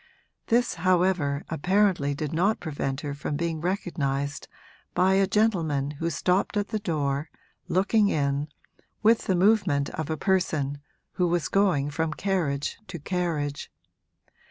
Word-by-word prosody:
This, 240 +1 +2
however, 180 -6 +2
apparently 175 -3 +2
did 150 +1 -4
not 195 +7 +2
prevent 140 -4 -3
her 145 -2 -4
from 145 +1 -4
being 165 0 -2
recognised 145 -6 -2 0.5
by 185 +1 +4
a 195 0 +3
gentleman 170 -10 +1
who 165 +3 -3
stopped 180 +6 0
at 205 0 -1
the 215 - -1
door, 150 -5 -1 0.4
looking 205 +3 +3
in, 140 -2 0 0.6
with 225 +1 +4
the 190 - +2
movement 180 -7 +3
of 160 -1 -4
a 160 - -1
person 150 -7 0 0.3
who 180 - 0
was 170 -1 0
going 180 -8 +2
from 160 +1 -1
carriage 165 -8 -1
to 190 -3 -6
carriage. 155 -3 -2
165 Hz, 135 wpm, -26 LUFS, 145-190 Hz, 0.6 s, by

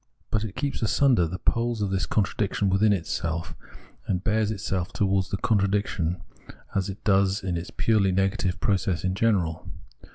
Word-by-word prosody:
But 105 0 +1
it 105 -3 -6
keeps 140 +1 -2
asunder 115 -4 +3
the 90 +3 -5
poles 115 +2 0
of 100 - -2
this 95 -1 0
contradiction 100 -1 0
within 105 +3 +4
itself; 85 -1 -2 0.5
and 90 -1 -1
bears 110 0 +1
itself 95 -3 -2
towards 95 -2 +1
the 95 - -2
contradiction 100 -6 0 0.5
as 95 0 0
it 100 +1 -8
does 100 -1 +2
in 90 -2 -1
its 85 +1 -4
purely 105 -4 +2
negative 95 0 0
process 95 -4 0
in 95 0 0
general. 95 -6 0
95 Hz, 160 wpm, -26 LUFS, 90-105 Hz, 0.5 s, within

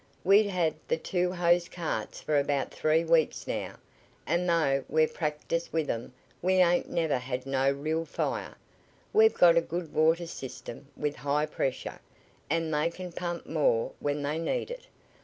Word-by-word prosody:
We've 200 +2 +5
had 175 -5 +1 0.2
th' 485 - 0
two 180 -1 0
hose 175 -1 +2
carts 160 -11 -4
for 150 -2 +2
about 140 -1 -1
three 155 +1 +2
weeks 165 -1 +2
now, - - -4 0.5
an' 170 +4 0
though 145 -6 +2
we've 155 0 +2
practiced 155 +2 -2
with 160 -2 0
'em 115 +2 -5 0.3
we 185 +2 +2
ain't 175 -1 +3
never 160 -6 0
had 125 0 -4
no 135 0 +2
real 155 +4 -1
fire. - - -3 0.6
We've 445 +1 +6
got 170 -1 +6
a - - +6
good 165 -1 -5
water 165 +2 +3
system, 135 -4 -8
with 150 -1 -2
high 145 +1 0
pressure, 135 -3 -3 0.5
an' 165 +1 0
they 150 +2 +1
can 180 +1 -8
pump 175 0 -4
more - - +1
when 145 0 -2
they 150 +3 -1
need 250 - -2
it. - - -8
165 Hz, 165 wpm, -29 LUFS, 145-175 Hz, 0.6 s, We've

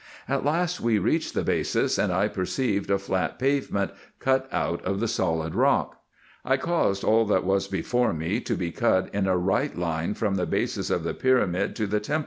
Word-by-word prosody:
At 135 +1 0
last 170 +5 0
we 115 -2 +2
reached 100 - 0
the - - +1
basis, - - 0
and - - +1
1 - - +1
perceived 100 +1 -1
a 100 - +3
flat 95 -3 -2
pavement 130 -7 0 0.3
cut 130 0 +1
out 85 - -1
of 95 +1 -1
the 115 - 0
solid 80 -7 -1
rock. - - +1 0.4
I 135 - +2
caused 135 - 0
all 110 +1 +4
that 100 -3 +2
was 95 +1 +1
before 120 +4 0
me 85 +7 -1
to - - -2
be 85 -2 -3
cut 95 -2 +1
in 100 -1 0
a 95 -1 +2
right 95 +10 0
line 85 +2 -1
from 100 -3 0
the 90 - -1
basis - - -1
of - - 0
the - - -2
pyramid 125 -9 +1
to 110 - -1
the 105 +1 0
temple? 105 +9 -1
100 Hz, 200 wpm, -26 LUFS, 95-125 Hz, 0.4 s, all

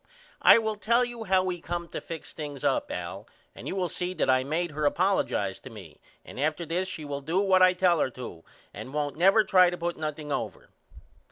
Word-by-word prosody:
I - - +8
will 220 -2 -1
tell 235 +4 +2
you 240 -2 -7
how 190 -1 +3
we 180 -2 -3
come 170 0 -4
to - - -5
fix 165 -2 -8
things 145 -3 -7
up - - +1
Al - - -6 0.3
and - - -10
you - - -3
will 185 -2 0
see 180 +2 -4
that 130 - +2
I 130 0 +3
made 160 +4 -2
her 150 0 +1
apollojize 185 - 0
to - - -10
me 95 -9 -13 0.2
and - - -10
after 155 +3 -1
this 175 +4 -1
she 160 -5 -6
will 140 -1 -4
do 165 +7 0
what 190 -2 +3
I 185 0 +6
tell 180 -2 +2
her 135 - +1
to 120 -10 -9 0.3
and 135 - -8
won't 145 -2 -1
never 195 +6 +5
try 185 -4 +5
to 175 - -5
put 175 0 -3
nothing 150 -1 -5
over. - - -4
170 Hz, 225 wpm, -27 LUFS, 145-185 Hz, 0.3 s, I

